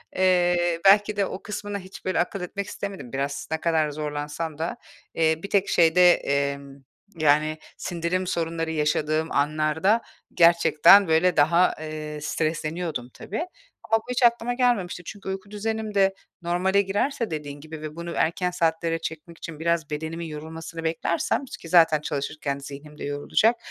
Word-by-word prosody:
eee, 175 -2 +2
belki 205 +2 +6
de 200 - +2
o 190 - -7
kısmına 205 -1 -5
hiç 190 0 -12
böyle 185 - 0
akıl 180 +2 -1
etmek 200 +2 -4
istemedim 190 -12 -7
biraz. 140 +1 -3
Ne 160 - +1
kadar 160 -2 +2
zorlansam 150 +1 -4
da, 165 +2 -3 0.4
eee, 160 -1 +2
bir 200 - -5
tek 200 -1 +2
şeyde, 175 +1 +6
emm, 140 0 -2 0.4
yani, 155 0 +3 0.2
sindirim 180 +1 -2
sorunları 165 -2 -2
yaşadığım 155 +1 0
anlarda 155 +9 +1 0.3
gerçekten 170 +3 +6
böyle 165 +3 +3
daha, 170 +5 +4
eee, 155 -1 -6
stresleniyordum 155 -3 -2
tabii 205 - -6 0.5
ama 225 - +5
bu 225 - -8
hiç 250 0 0
aklıma 235 0 +3
gelmemişti. 240 -8 0
Çünkü 195 +2 -8
uyku 190 +1 -6
düzenim 220 +1 -3
de 195 -1 +3 0.3
normale 180 +3 +2
girerse 210 +4 -1
dediğin 145 -2 -5
gibi 155 0 -9
ve 155 0 -7
bunu 170 0 -6
erken 180 +2 +1
saatlere 165 -1 0
çekmek 165 +1 -7
için 160 -3 -8
biraz 170 -2 0
bedenimin 160 +3 -4
yorulmasını 160 +1 -7
beklersem 170 +10 -1
ki 170 -9 -10
zaten 160 -3 +5
çalışırken 140 -1 -3
zihnim 145 +2 -10
de - - -8
yorulacak, 145 +11 +2
165 Hz, 150 wpm, -25 LUFS, 155-190 Hz, 0.5 s, belki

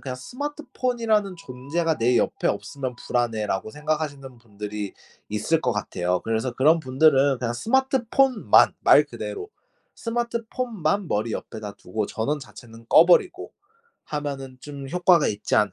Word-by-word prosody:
그냥 130 -2 -5
'스마트폰이라는 235 - -2
존재가 155 +4 -2
내 120 +2 +3
옆에 - - +1
없으면 130 -3 -4
불안해.'라고 110 -5 -1
생각하시는 150 -3 -4
분들이 105 -2 -6 0.4
있을 110 +10 0
것 125 - 0
같아요. 90 0 -1
그래서 115 +3 -1
그런 155 +7 +4
분들은 135 -1 +3
그냥 120 -1 -2
스마트폰만 265 - +3
말 - - +6
그대로 410 +1 -6 0.5
스마트폰만 230 -5 -2
머리 110 +3 -1
옆에다 105 -2 -6
두고 105 +3 -4
전원 140 +9 -2
자체는 115 -4 -13
꺼 165 - +7
버리고 360 - +2 0.5
하면은 140 -3 -5
'좀 140 -2 -8
효과가 175 0 +4
있지 105 0 -2
않을 105 -3 +3
140 Hz, 335 characters per minute, -24 LUFS, 115-195 Hz, 0.5 s, 꺼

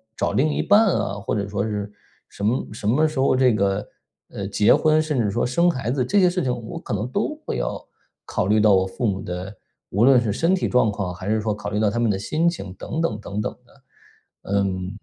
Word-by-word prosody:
找 - - -1
另 155 +4 +2
一 - - 0
半 215 +2 +5
啊， 165 - 0
或 100 - -4
者 100 -1 -2
说 100 0 -2
是 105 -1 -3 0.4
什 100 - -9
么 120 +5 0
什 105 -1 -5
么 150 +8 +3
时 155 -2 -7
候 130 -1 +3
这 125 -3 +3
个， 100 0 0 0.4
呃， 100 - -5
结 105 +1 +4
婚， 155 0 +3
甚 150 -4 -1
至 105 -4 +1
说 120 - 0
生 170 +8 +2
孩 130 -7 -2
子 130 -1 0
这 200 +11 +2
些 180 -2 +5
事 180 -2 -1
情， 125 -1 0
我 - - -7
可 - - -6
能 105 +4 -2
都 220 - -1
会 - - -3
要 - - -3 0.4
考 - - -2
虑 105 +2 +3
到 105 -2 +5
我 95 0 +2
父 115 +5 -2
母 95 -1 -1
的， 90 +2 -5 0.4
无 105 +5 +2
论 130 -2 +6
是 110 -3 -1
身 165 - +1
体 185 - 0
状 125 -4 +3
况， 100 -3 -3
还 95 +2 -8
是 110 +1 +1
说 105 -1 -1
考 105 0 -6
虑 105 - -1
到 110 - +3
他 105 - -4
们 120 -1 +2
的 95 - -2
心 155 +11 0
情 100 - -2
等 160 +10 -4
等 110 -11 -1
等 105 0 -4
等 - - -2
的， - - -24 0.7
嗯。 95 0 -1
110 Hz, 270 characters per minute, -22 LUFS, 100-135 Hz, 0.7 s, 论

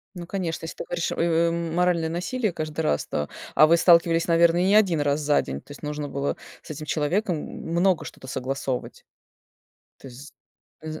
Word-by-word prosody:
Ну, 175 -1 -7
конечно, 175 -4 -3
если 160 - -7
ты - - -5
говоришь: 170 -1 -2
"Ой 170 - 0
ой, 170 0 +3
м 165 -1 -3
моральное 175 -2 +2
насилие"- 195 +6 -2
каждый 155 -1 -4
раз, 75 - 0
то 75 - -3 0.3
А 155 - +7
вы 165 +2 +5
сталкивались, 170 -1 +4
наверно, 170 0 +4
и 180 - +2
не 200 - +3
1 185 -7 +4
раз 145 +1 +1
за 145 0 +3
день, 70 +1 -6
то - - -25
есть - - -13
нужно 150 -1 -4
было 140 0 -2 0.3
с - - -15
этим 155 0 -6
человеком 170 +5 0
много 170 +4 -1
что-то - - -10
согласовывать? 130 0 -4 0.9
То - - -11
есть 130 +4 -12 0.5
з 155 0 -6
165 Hz, 195 wpm, -25 LUFS, 150-175 Hz, 0.9 s, А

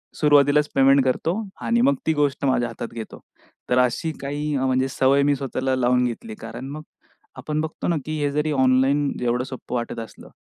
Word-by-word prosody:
सुरुवातीलाच 145 0 +4
पेमेंट 135 0 +5
करतो 145 +6 0 0.3
आणि 235 0 +1
मग 275 +2 +4
ती 160 - +3
गोष्ट 145 -2 0
माझ्या 125 -2 +1
हातात 120 - -7
घेतो. 115 -2 -8 0.5
तर 125 - +2
अशी 125 +6 +1
काही 145 +2 -3
म्हणजे 130 0 +1
सवय 135 +2 +3
मी 145 0 +3
स्वतःला 130 -1 -2
लावून 125 0 +2
घेतली. 115 -2 -5
कारण 115 +4 -8
मग 155 - -6 0.6
आपण 155 0 -2
बघतो 160 0 -4
ना, 170 - +1
की 155 - -5
हे 145 - 0
जरी 150 +2 0
ऑनलाईन 135 +1 +3
एवढं 125 +1 0
सोपं 130 -1 -7
वाटत 120 -1 -3
असलं 115 - -10
135 Hz, 185 wpm, -23 LUFS, 125-150 Hz, 0.6 s, पेमेंट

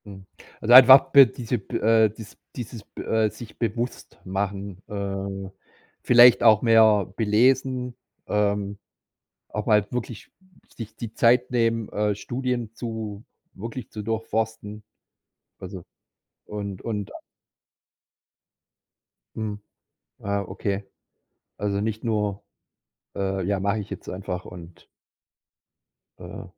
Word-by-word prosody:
Hm, 95 -2 -11 0.3
also 115 - +2
einfach 130 +1 +9
b 140 -1 +9
diese 120 0 -4
b 95 - -5
äh, 110 0 +4
des 110 0 -12 0.2
dieses 115 -2 -7
b - - -10
äh, 110 -1 +1
sich 110 +2 -12
bewusst 120 +1 -4
machen, 95 0 -4
äh, 100 -1 -5 0.5
vielleicht 120 0 +7
auch 110 -2 +6
mehr 110 -3 +5
belesen, 125 +3 +1 0.3
ähm, 100 -1 -1 0.7
auch 105 - -5
mal 105 -2 +3
wirklich 120 -3 -6 0.4
sich 110 -1 -9
die 115 -2 -7
Zeit 120 +2 +3
nehmen, 115 -2 0
äh, 105 0 0
Studien 120 0 -4
zu, 110 -3 -6 0.3
wirklich 115 +3 -8
zu 105 - -7
durchforsten. 110 -1 -3 0.8
Also 95 -1 -8 0.6
und 100 -2 -6
und 105 -3 -4
a - - -9 2.2
Mhm, 105 -2 -5 0.6
ah, 100 0 -2
okay. 100 +1 -4 0.7
Also, 100 -1 -1
nicht 110 0 -3
nur, 105 -3 -1 0.7
äh, 95 -1 -2
ja 100 +1 0
mache 100 +3 0
ich 105 0 -7
jetzt 100 - -8
einfach 90 -1 -5
und 85 -1 -12 1.3
Äh. - - -9
105 Hz, 115 wpm, -24 LUFS, 100-115 Hz, 2.2 s, einfach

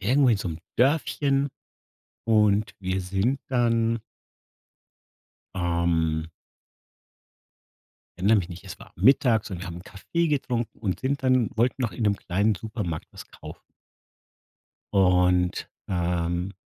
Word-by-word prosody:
irgendwo 130 +7 +3
in 115 - +4
so 100 - -4
'nem 80 -1 -5 0.2
Dörfchen 140 +1 +2 0.8
und 105 -1 +3
wir 95 0 -2
sind 100 +9 0
dann 115 -2 +1 1.5
ähm 85 -2 0 1.9
erinnere 105 +4 +4
mich 90 -3 -3
nicht, 85 -2 -10
es - - -9
war - - -14
mittags 120 -5 +3
und 95 - -4
wir 90 - -6
haben 85 -1 -7
Kaffee 170 - -2
getrunken 125 -5 -2
und 95 -4 -2
sind 135 +1 -1
dann 130 -3 +3
wollten 125 +3 +1
noch 115 -6 -1
in 85 - -5
'nem 105 -2 +2
kleinen 100 +3 0
Supermarkt 100 -5 -5
was - - -11
kaufen - - -11 1.3
und, 90 -2 +3 0.2
ähm, 85 0 -1
100 Hz, 120 wpm, -25 LUFS, 90-120 Hz, 1.9 s, in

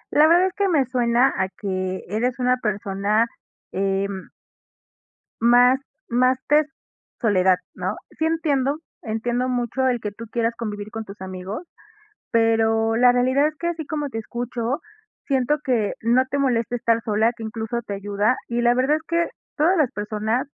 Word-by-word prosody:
La 300 +1 +7
verdad 345 +3 +5
es 375 - -1
que 400 -1 +1
me 295 -7 +3
suena 245 +1 +2
a 190 0 +1
que 185 -1 -4
eres 235 +6 -1
una 250 0 +2
persona, 205 -1 0 0.5
em 195 0 -2 1.1
más 245 +2 +5 0.3
más 255 +2 +3
de 300 +1 +4 0.5
soledad, 190 -5 +3 0.2
¿no? - - -3 0.2
Sí 315 - +2
entiendo. 295 -4 +1 0.2
Entiendo 240 +3 -1
mucho 250 +1 0
el 245 -2 +1
que 210 -1 -4
tú 230 +3 -9
quieras 230 -1 0
convivir 210 -2 -5
con 225 -1 -5
tus 200 +1 -11
amigos, 190 - -6 0.6
pero 225 0 +2
la 245 +1 +6
realidad 260 +4 +3
es 305 - -9
que 340 - -2
así 330 -2 -3
como 295 -2 -2
te 225 -4 -5
escucho, 240 +3 -3 0.5
siento 275 +2 +1
que 230 -6 +1
no 240 +3 +3
te 280 - 0
molesta 245 -3 +1
estar 230 -1 +1
sola, 220 +2 +2
que 230 - -9
incluso 225 +1 -3
te 200 - -3
ayuda. 205 +4 0
Y 235 0 -1
la 240 0 +4
verdad 265 +4 +2
es 315 - -7
que 340 0 +1 0.3
todas 330 +5 +3
las 300 -7 +2
personas 215 +4 -2
235 Hz, 165 wpm, -23 LUFS, 215-260 Hz, 1.1 s, La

